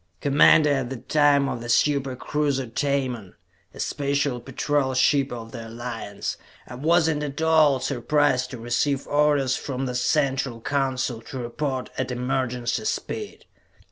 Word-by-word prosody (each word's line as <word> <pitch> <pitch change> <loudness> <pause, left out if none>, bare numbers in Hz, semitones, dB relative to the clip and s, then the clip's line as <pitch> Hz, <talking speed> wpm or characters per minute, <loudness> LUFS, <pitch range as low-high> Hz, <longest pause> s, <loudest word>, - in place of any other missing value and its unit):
Commander 145 +1 +5
at 135 -3 0
that 130 -3 -8
time 145 -2 +4
of 120 - -3
the 120 - -7
super 135 +1 +2
cruiser 140 0 -1
Tamon, 125 -5 -2 0.4
a - - -14
Special 140 -2 -1
Patrol 135 +2 -1
ship 140 +1 +3
of 115 -2 -7
the 115 -2 -7
Alliance, 115 -3 -5 0.3
I - - -9
was 160 +6 +2
not 150 -2 0
at 145 -1 -4
all 160 -4 +4
surprised 140 0 +1
to 125 - -7
receive 130 +4 -1
orders 145 -3 +2
from 135 -1 -4
the 125 - -3
Central 135 -2 0
Council 130 -2 -1
to 130 - -8
report 130 +2 -3
at 130 - -1
emergency 125 - -2
speed. 425 - -4
135 Hz, 145 wpm, -24 LUFS, 125-145 Hz, 0.4 s, Commander